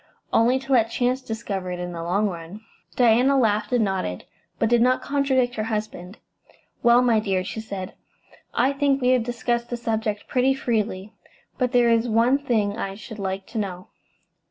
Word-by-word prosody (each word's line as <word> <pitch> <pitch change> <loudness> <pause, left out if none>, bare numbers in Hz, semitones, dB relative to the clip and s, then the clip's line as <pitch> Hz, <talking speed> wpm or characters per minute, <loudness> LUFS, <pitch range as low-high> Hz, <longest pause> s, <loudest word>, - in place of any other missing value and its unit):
"Only 240 +3 +4
to 270 +1 -7
let 225 -3 +4
chance 250 +2 0
discover 220 -6 -4
it 180 - -4
in 180 0 -4
the 170 -1 -6
long 190 +5 +1
run." 175 +2 -7 0.3
Diana 245 +3 +4
laughed 215 -3 +1
and 240 -3 +3
nodded, 185 - -3 0.3
but 225 - +1
did 240 +1 +3
not 255 +1 +3
contradict 265 -3 +1
her 215 - -1
husband. 210 -3 -5 0.6
"Well, 240 +1 +5
my 235 -3 +3
dear," 195 -3 -1
she 205 - -6
said, 195 -4 -6 0.6
"I 265 +3 +2
think 280 -1 +1
we 250 -1 +1
have 255 -1 +4
discussed 235 0 -2
the 240 - -3
subject 220 -3 -2
pretty 265 +1 +2
freely, 215 -5 -2 0.5
but 250 -2 +1
there 240 -1 +4
is 230 +1 +2
one 235 +5 +3
thing 220 -7 0
I 195 -3 -4
should 220 +1 -10
like 190 0 -3
to 225 - -3
know. 185 -3 -5
225 Hz, 180 wpm, -23 LUFS, 200-250 Hz, 0.6 s, Well